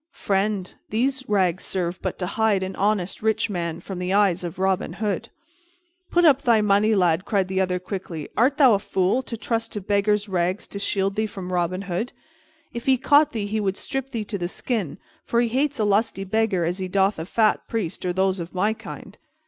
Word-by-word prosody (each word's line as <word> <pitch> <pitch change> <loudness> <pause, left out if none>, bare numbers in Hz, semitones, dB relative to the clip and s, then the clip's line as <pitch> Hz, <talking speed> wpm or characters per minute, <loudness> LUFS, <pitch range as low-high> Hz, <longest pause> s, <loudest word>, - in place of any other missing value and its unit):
"Friend, 195 - -1 0.2
these 260 +4 0
rags 190 -3 +2
serve 180 -1 -3
but - - -3
to 180 - -2
hide 210 0 +1
an 190 0 -4
honest 200 -2 0
rich 220 0 +1
man 170 -3 -3
from 180 +1 -7
the 180 +1 -1
eyes 195 -3 +3
of 170 -2 -5
Robin 190 0 0
Hood." 215 +1 -2 0.8
"Put 350 0 +3
up 280 -4 +6
thy 230 -3 +4
money, 210 +1 +3
lad," 175 -2 +2
cried 195 -3 0
the 190 0 0
other 180 -1 0
quickly. 180 -4 -6
"Art 265 +5 +3
thou 265 -6 +7
a 200 - +3
fool, 195 +4 +1
to 240 -3 -7
trust 230 0 -2
to 210 - -2
beggar's 205 +1 +1
rags 185 +1 -1
to 200 - -6
shield 195 -1 0
thee 220 0 0
from 185 -3 -7
Robin 180 +2 0
Hood? 200 +6 -3 0.6
If 235 +2 -6
he 265 -1 +5
caught 290 +4 +4
thee, 220 -4 -3
he 215 +2 -1
would 195 -2 -1
strip 270 -1 -4
thee 230 -5 -4
to 200 -1 -4
the 175 - -1
skin, 195 - -3 0.3
for 235 - 0
he 240 -1 +2
hates 275 +4 0
a 220 - +1
lusty 205 -1 +1
beggar 195 -3 +1
as 175 +3 -2
he 185 - -2
doth 195 0 +1
a 160 - -4
fat 215 +1 +2
priest 215 -8 -3
or 180 - 0
those 190 +1 +1
of 170 +2 -7
my 205 +4 +2
kind." - - -10
200 Hz, 215 wpm, -24 LUFS, 185-220 Hz, 0.8 s, thou